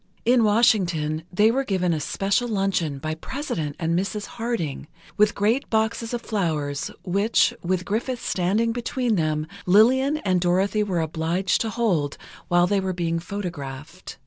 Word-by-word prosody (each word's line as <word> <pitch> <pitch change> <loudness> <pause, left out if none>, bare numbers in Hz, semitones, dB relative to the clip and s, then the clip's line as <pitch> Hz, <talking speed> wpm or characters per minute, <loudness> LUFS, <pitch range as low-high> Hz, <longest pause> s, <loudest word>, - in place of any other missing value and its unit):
In 240 0 +4
Washington, 180 -8 +2
they 210 +5 +4
were 270 +3 0
given 185 -7 0
a 155 - -1
special 195 +9 0
luncheon 195 -9 0
by 155 +3 -3
President 160 - -4
and 165 -1 -1
Mrs. 200 +3 -2
Harding, 225 - -4 0.3
with 210 0 +3
great 220 +7 +1
boxes 225 +1 0
of 240 -1 -3
flowers 155 -9 -2
which, 200 +6 +2
with 180 +1 -1
Griffith 235 +5 -2
standing 205 +6 0
between 240 0 -1
them, 155 -4 0 0.2
Lillian 260 +9 +5
and 185 -2 +2
Dorothy 190 +4 +2
were 190 -5 0
obliged 165 +4 0
to 225 - -1
hold 185 -11 0 0.3
while 175 0 +4
they 200 +2 +1
were 190 -1 -2
being 170 -1 -1
photographed. 165 -4 -7
190 Hz, 150 wpm, -24 LUFS, 165-220 Hz, 0.3 s, Lillian